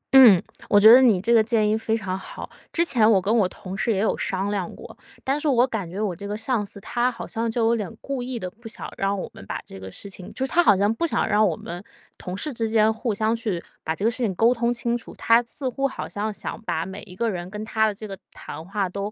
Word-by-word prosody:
嗯， 235 -9 +10 0.3
我 205 - +6
觉 220 +2 +10
得 255 - +9
你 225 -8 +5
这 230 +6 +1
个 225 -2 +6
建 220 -1 +2
议 210 - +2
非 220 0 0
常 190 -4 -3
好。 195 - -8 0.2
之 340 - +2
前 225 -9 +3
我 200 - +5
跟 200 +5 +1
我 210 -5 +4
同 185 0 -8
事 220 +3 0
也 205 - +1
有 210 +3 +1
商 195 +2 -2
量 195 -4 -2
过， - - -11 0.3
但 275 +3 0
是 310 - -1
我 250 -3 +4
感 215 -9 -4
觉 185 +4 -6
我 205 -5 -1
这 200 +3 -7
个 205 +1 -3
上 225 0 -1
司， 200 0 -10
他 240 +5 0
好 235 - -7
像 230 +1 -2
就 225 0 0
有 230 +1 +3
点 210 -6 -4
故 275 -2 -4
意 250 0 -4
的 185 - -4
不 225 +3 -13
想 220 - -7
让 195 0 0
我 - - -4
们 - - -12
把 - - -3
这 95 - -11
个 95 0 -8
事 200 - -9
情 190 -2 -9
就 265 - -2
是 265 - -6
他 350 - +5
好 210 - +5
像 205 +3 +2
不 335 +9 -1
想 - - 0
让 215 0 +4
我 170 - 0
们 175 +4 -8 0.4
同 180 +1 -5
事 300 +7 -4
之 225 -2 -1
间， 220 0 +4
互 225 +1 -2
相 215 +2 +1
去 215 -7 -3 0.2
把 160 - -2
这 200 - -3
个 230 - +4
事 235 - -7
情 230 -6 0
沟 230 +6 +4
通 235 0 0
清 240 0 -1
楚。 240 - -8
他 230 +1 +4
似 250 +3 -6
乎 275 +2 0
好 265 - -6
像 210 +1 -3
想 210 - -6
把 165 -7 -2
每 190 +2 -7
一 180 - -12
个 230 +3 0
人 175 -1 -5
跟 210 +2 -6
他 220 0 +2
的 215 - -1
这 215 +2 -8
个 195 - -6 0.2
谈 160 - -9
话 195 +2 -2
都， 200 +3 -4
220 Hz, 310 characters per minute, -24 LUFS, 195-235 Hz, 0.4 s, 嗯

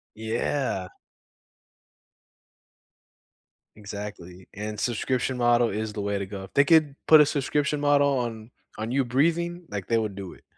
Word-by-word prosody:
Yeah. 110 -2 -2 2.9
Exactly, 100 -4 -9
and 105 +1 -5
subscription 125 +2 -1
model 120 -1 +3
is 110 +1 -3
the 105 - -4
way 100 0 -1
to 100 - -3
go. 95 -1 -7
If 95 - -13
they 140 - +5
could 155 -3 +4
put 155 -1 +9
a - - +6
subscription 145 +1 0
model 140 -2 +3
on 115 -1 -5 0.3
on 110 +2 -3
you 135 0 +2
breathing, 170 +7 0
like, 100 -3 -5
they 115 -1 +2
would 105 -3 -3
do 95 -3 -7
it. - - -19
120 Hz, 150 wpm, -26 LUFS, 105-140 Hz, 2.9 s, put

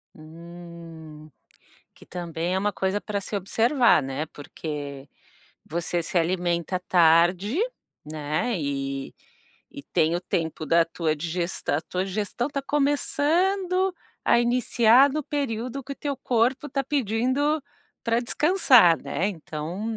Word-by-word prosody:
Hum. 165 -1 -12 0.6
Que - - -18
também, 170 0 -3
é - - +1
uma 205 +2 0
coisa, 190 +1 -1
pra 205 -1 -3
se 200 - -7
observar, 230 - +3
né, 135 +3 -4
porque, 145 -2 -7 0.6
você 170 +1 -2
se 175 - 0
alimenta 175 +1 0
tarde, 180 - +3 0.5
né, 155 +8 -2
e 135 -1 -3 0.6
e 140 - -9
tem 160 +3 +1
o - - -3
tempo 160 -3 -3
da 165 +1 +4
tua 165 -1 -1
digestão, 170 -1 -2
a - - -1
tua 185 +3 -3
digestão 205 +5 -2
está 280 -1 -3
começando 350 +7 +1 0.3
a 235 - +4
iniciar 240 +2 +4
no 305 +1 -2
período 265 -2 -3
que 280 - -6
o - - -9
teu 285 -2 -3
corpo 250 +2 0
está 275 0 -1
pedindo 270 +4 0 0.4
pra 230 0 +2
descansar, 250 - +4
né, 195 - -1
então, 175 +5 -5
185 Hz, 130 wpm, -25 LUFS, 165-250 Hz, 0.6 s, da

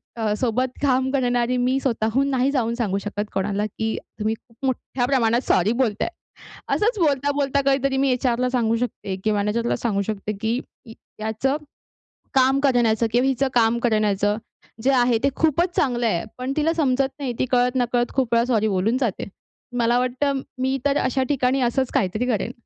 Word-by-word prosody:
अ, 220 -3 0
सोबत 255 +1 0
काम 260 -2 +2
करणारी 245 -2 +1
मी 255 +2 +1
स्वतःहून 255 +2 0
नाही 260 0 +1
जाऊन 235 -5 0
सांगू 210 -5 -1
शकत 205 0 -4
कोणाला, 200 +2 -1
की 220 +1 -3 0.2
तुम्ही 215 +1 0
खूप 230 +3 -11
मोठ्या 255 -1 -1
प्रमाणात 240 -3 +2
सॉरी 185 +4 +3
बोलताय. 215 -4 0 0.7
असंच 430 +1 +1
बोलता-बोलता 285 -2 +1
काहीतरी 275 0 +2
मी 275 0 +2
एच-आरला 250 0 +1
सांगू 230 -3 +1
शकते 230 -5 -3
किंवा 215 -1 +1
मॅनेजरला 225 +4 0
सांगू 205 -4 -1
शकते, 210 0 -3
की 225 +3 0 0.6
याचं 220 +6 0 0.8
काम 265 +1 +4
करण्याचं 235 -4 +3
किंवा 245 +3 +2
हिचं 270 0 +1
काम 230 -1 +3
करण्याचं, 210 -2 +1 0.5
जे 275 - +4
आहे 245 -2 +3
ते 275 - +4
खूपच 335 +3 +1
चांगलं 245 -4 +1
आहे. 170 -6 0
पण 255 +2 -3
तिला 320 +2 +2
समजत 270 -4 +1
नाही. 265 -4 -2
ती - - +2
कळत-नकळत 245 -1 +1
खूप 255 -3 0
वेळा 235 0 +4
सॉरी 220 -4 +1
बोलून 210 +5 +1
जाते. 230 -7 -1 0.5
मला 240 +1 +3
वाटतं, 265 +2 0 0.2
मी 265 +1 +1
तर 285 0 +2
अशा 260 +1 +1
ठिकाणी 265 -1 +1
असंच 250 +2 0
काहीतरी 200 +5 0
करेन. 225 -2 -1
245 Hz, 165 wpm, -23 LUFS, 220-265 Hz, 0.8 s, काम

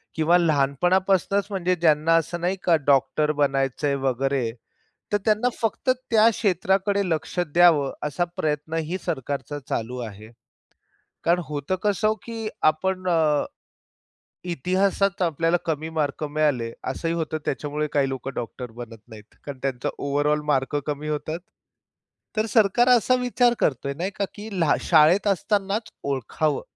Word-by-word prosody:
किंवा 160 +2 +4
लहानपणापासूनच 180 +6 +2
म्हणजे 185 -2 0
ज्यांना 160 -1 +3
असं 170 +1 -2
नाही 180 +2 0
का 170 - +4
डॉक्टर 140 +2 +3
बनायचंय 140 0 0
वगैरे, 135 -2 0 0.6
तर 205 - +3
त्यांना 215 +3 +2
फक्त 230 +3 0 0.2
त्या 225 0 +6
क्षेत्राकडे 200 -1 +1
लक्ष 160 +2 -3 0.2
द्यावं 165 -6 +5 0.2
असा 160 +5 -1
प्रयत्नही 155 +3 -2
सरकारचा 145 -3 -3
चालू 120 +2 -3
आहे. 105 +2 -12 0.9
कारण 175 +1 +3
होतं 150 +4 -2
कसं 215 +1 +2
की 225 -2 -5 0.2
आपण 185 +4 +1
अ, 155 -4 +2 1.1
इतिहासात 190 +5 0
आपल्याला 165 0 +2
कमी 160 -1 -2
मार्क 155 -2 -2
मिळाले. 145 -6 0 0.2
असंही 165 +5 -2
होतं 160 -1 -2
त्याच्यामुळे 150 +2 -2
काही 140 -2 +2
लोकं 135 0 -5
डॉक्टर 120 0 -6
बनत 115 0 -9
नाहीत. 110 -2 -14
कारण 140 -2 -7
त्यांचा 130 -3 -1
ओव्हरऑल 145 +2 0
मार्क 140 -1 0
कमी 150 +1 -3
होतात. 155 +2 -3 1.0
तर 215 - +2
सरकार 220 +3 +3
असा 250 0 +5
विचार 245 -1 +3
करतोय 140 0 0
नाही 185 +4 -2
का, 200 - -1
की 215 +1 -8
लहा 165 -3 +3
शाळेत 170 +5 +4
असतानाच 200 +2 0
ओळखावं 140 +2 -1
155 Hz, 130 wpm, -24 LUFS, 140-190 Hz, 1.1 s, त्या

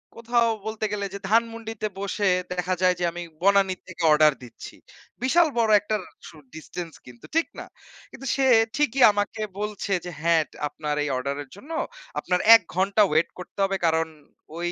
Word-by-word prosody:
কোথাও 235 0 +1 0.2
বলতে 220 0 -3
গেলে 200 -1 -2
যে 200 - -5
ধানমন্ডিতে 225 -1 0
বসে 200 +1 -1 0.3
দেখা 180 0 -1
যায় 180 -1 +4
যে - - -2
আমি 175 +1 -6 0.2
বনানী 195 0 +3
থেকে 185 -2 -7
অর্ডার 150 0 +5
দিচ্ছি। 120 - -11 0.5
বিশাল 330 +6 +4
বড় 225 -2 +2
একটা 210 +2 -2 0.3
সু - - -13 0.2
ডিসট্যান্স 165 +1 -7
কিন্তু 120 -2 -14
ঠিক 330 - +2
না? - - -7 0.5
কিন্তু 270 - -11
সে 270 -1 +2 0.3
ঠিকই 270 -3 +1
আমাকে 205 +2 -3 0.2
বলছে 210 -1 -3
যে, 180 - -5
"হ্যাঁ, 165 0 +3 0.3
আপনার 150 0 -4
এই 150 - -2
অর্ডারের 140 +2 -4
জন্য 270 +11 -13 0.5
আপনার 180 0 0 0.2
১ 225 - +5
ঘন্টা 195 +3 +2
ওয়েট 155 +2 +2
করতে 180 - -11
হবে।" 195 0 0
কারণ, 160 0 +2 0.5
ঐ - - -7
200 Hz, 165 wpm, -24 LUFS, 165-225 Hz, 0.5 s, অর্ডার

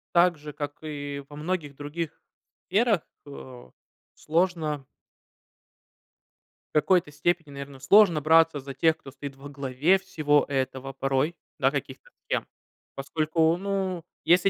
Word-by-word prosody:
Так 175 -1 +5
же, 150 0 -9
как 145 0 -4
и 145 -2 -5
во 145 - -11
многих 150 -2 -3
других 150 +3 -5 0.5
сферах, 210 -1 +3 0.3
э, 130 - -10 0.4
сложно 160 -4 0 1.9
В - - +6
какой-то 175 +1 +3
степени, 160 +1 -1
наверно, 140 -1 -8
сложно 175 +4 +6
браться 160 0 +5
за 135 0 -7
тех, 160 +4 +3
кто 140 - -12
стоит 140 0 -8
во 140 - -10
главе 140 +5 +2
всего 155 -6 +2
этого 135 0 -2
порой, 135 +3 0 0.2
да, - - +3
каких-то - - -5 0.2
схем. - - 0 0.5
Поскольку, 160 +3 +1
ну, 190 -2 -2 0.2
если 180 +3 +5
150 Hz, 130 wpm, -27 LUFS, 140-175 Hz, 1.9 s, В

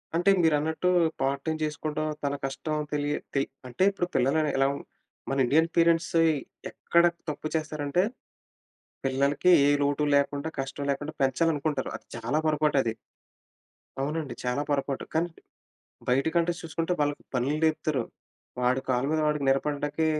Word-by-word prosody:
అంటే 175 +3 +3
మీరన్నట్టు, 160 +2 +2 0.3
part 135 +1 0
time 160 0 -1
చేసుకోవడం, 155 0 -2 0.2
తన 140 0 0
కష్టం 155 +3 -3 0.2
తెలియ 145 0 0 0.2
తె 135 - +3 0.3
అంటే, 175 +10 -1
ఇప్పుడు 180 -3 -2
పిల్లలు 135 +5 +3 0.2
ఎలా 135 0 +4 0.6
మన 135 - -1
ఇండియన్ 160 +6 +3
పేరెంట్స్ 165 0 +3 0.6
ఎక్కడ 170 0 +2 0.3
తప్పు 155 +1 -4
చేస్తారంటే, 155 +2 0 1.0
పిల్లలకి 140 +6 +2 0.2
ఏ - - +5
లోటు 145 +1 +1
లేకుండా 140 +2 0
కష్టం 135 +1 -4
లేకుండా 145 +3 -3
పెంచాలనుకుంటారు. 145 0 +1
అది - - -18
చాలా 120 +6 -1
పొరపాటు 150 0 +2
అది. - - -1 1.1
అవునండి. 150 +1 -2
చాలా 125 +3 0
పొరపాటు. 140 -1 -1
కానీ 170 +2 +1 0.8
బయట 135 +5 +2
కంట్రీస్ 170 0 +1
చూసుకుంటే 165 +2 -1
వాళ్ళకి 145 0 0
పనులు 130 +4 +1
నేర్పుతారు. 155 -5 +1 0.6
వాడి 125 +1 +2
కాళ్ళ 125 +1 +2
మీద 160 - +1
వాడికి 150 -2 0
నిలబడడానికి 145 +3 0
150 Hz, 135 wpm, -27 LUFS, 140-160 Hz, 1.1 s, ఏ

